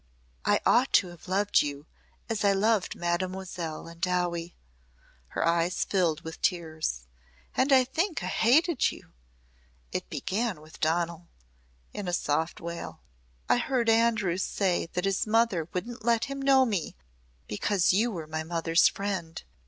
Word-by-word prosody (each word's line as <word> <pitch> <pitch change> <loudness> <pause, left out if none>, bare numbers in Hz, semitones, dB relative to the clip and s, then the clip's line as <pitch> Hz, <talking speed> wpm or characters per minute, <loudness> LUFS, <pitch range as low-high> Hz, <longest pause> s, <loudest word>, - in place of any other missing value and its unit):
"I - - +3
ought 250 +3 +4
to 185 - +4
have 175 0 -14
loved 200 +2 +3
you 145 0 -4 0.4
as 220 -2 -2
I 200 -1 +4
loved 210 0 +1
Mademoiselle 175 -2 -3
and 170 0 -12
Dowie." 175 -1 -1 0.7
Her - - -2
eyes 170 +2 +1
filled 175 -6 0
with 160 0 -9
tears. 160 - -1 0.5
"And 270 +2 +2
I 260 -1 +7
think 325 +7 -2
I - - -2
hated 295 +6 +3
you. - - -13 0.8
It - - -4
began 210 -3 -2
with 155 +1 -15
Donal," 170 +1 -1 0.7
in 205 -3 -5
a 175 - -2
soft 160 0 0
wail. 170 0 -7 0.5
"I - - +4
heard 245 -2 0
Andrews 220 -6 +2
say 185 -5 0
that 180 +1 -1
his 195 +2 0
mother 215 -7 +2
wouldn't 230 +5 -5
let 235 -1 +2
him 275 0 -5
know 270 -1 +5
me 200 -9 -2 0.5
because 180 - +1
you 220 +5 +3
were 170 -8 -5
my 155 +1 -4
mother's 165 +1 +3
friend. 190 -5 -4
185 Hz, 150 wpm, -28 LUFS, 170-225 Hz, 0.8 s, I